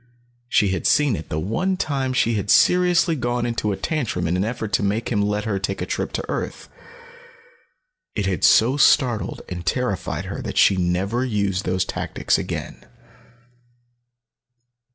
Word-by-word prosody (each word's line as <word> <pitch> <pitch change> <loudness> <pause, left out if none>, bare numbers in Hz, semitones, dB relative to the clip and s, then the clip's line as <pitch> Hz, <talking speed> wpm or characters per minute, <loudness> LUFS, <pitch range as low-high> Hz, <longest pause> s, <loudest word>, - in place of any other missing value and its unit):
She 105 - +3
had 95 -2 -1
seen 145 -5 +3
it 80 - -8
the 75 - -2
one 180 - -1
time 135 -7 -1
she 130 -2 +1
had 105 -1 -2
seriously 180 - +4
gone 120 -2 -1
into 115 -3 -1
a 95 - -3
tantrum 120 - -2
in 85 - 0
an 90 - 0
effort 110 -2 -4
to - - +2
make 105 +3 -1
him 105 -3 +1
let 105 +1 0
her 100 -3 -1
take 95 +1 -3
a - - -2
trip - - -3
to - - -3
earth. - - -5 1.5
It 105 - -1
had 95 -5 -2
so 125 +5 +5
startled 125 -6 +2
and 90 -1 -6
terrified 125 -2 -2
her - - -5
that - - -5
she - - +6
had 95 - -1
never 95 +8 0
used 100 -6 -1
those 95 0 0
tactics - - -1
again. - - -6
105 Hz, 170 wpm, -22 LUFS, 95-130 Hz, 1.5 s, she